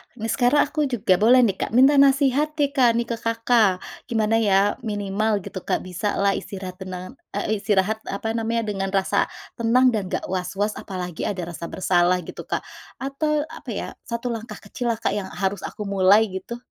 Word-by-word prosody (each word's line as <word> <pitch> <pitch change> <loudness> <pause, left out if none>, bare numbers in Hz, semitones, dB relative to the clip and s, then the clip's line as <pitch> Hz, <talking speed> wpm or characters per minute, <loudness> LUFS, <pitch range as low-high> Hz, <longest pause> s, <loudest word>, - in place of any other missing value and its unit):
ini 225 -1 -4
sekarang 270 +3 +4
aku 300 0 -1
juga 200 -7 +1
boleh 245 +4 +6
nih 195 -4 +1
Kak, 225 - -6
minta 275 +3 +6
nasihat 280 +2 +3
nih 285 -2 +1
Kak, 260 -4 +4
nih 235 0 0
ke 230 - -1
Kakak, 230 -4 +2 0.2
gimana 225 -1 +1
ya, 200 -1 +2
minimal 205 0 -1
gitu 185 - -6
Kak, - - -2
bisalah 200 +2 0
istirahat 190 -2 -6
tenang 185 - -8 0.2
eee, 215 -1 -1
istirahat, 205 +1 +1
apa 220 +3 -3
namanya, 225 -1 -1
dengan 195 -1 -2
rasa 195 0 +1 0.3
tenang 250 +2 +4
dan 205 -4 -2
nggak - - -3
was-was, 190 +3 -1
apalagi 180 -2 -5
ada 190 -4 -3
rasa 170 0 -6
bersalah, 180 -1 +2
gitu, - - -9
Kak? - - -2 0.4
Atau, 295 +2 0
apa - - -10
ya, - - -3 0.2
satu 235 +1 -3
langkah 225 -1 -6
kecil 240 +4 -5
lah 230 - +2
Kak, - - -1
yang 200 -2 -3
harus 195 +1 -2
aku 210 - -6
mulai, 200 +2 +4 0.2
gitu? 235 +4 -7
215 Hz, 185 wpm, -23 LUFS, 195-240 Hz, 0.4 s, boleh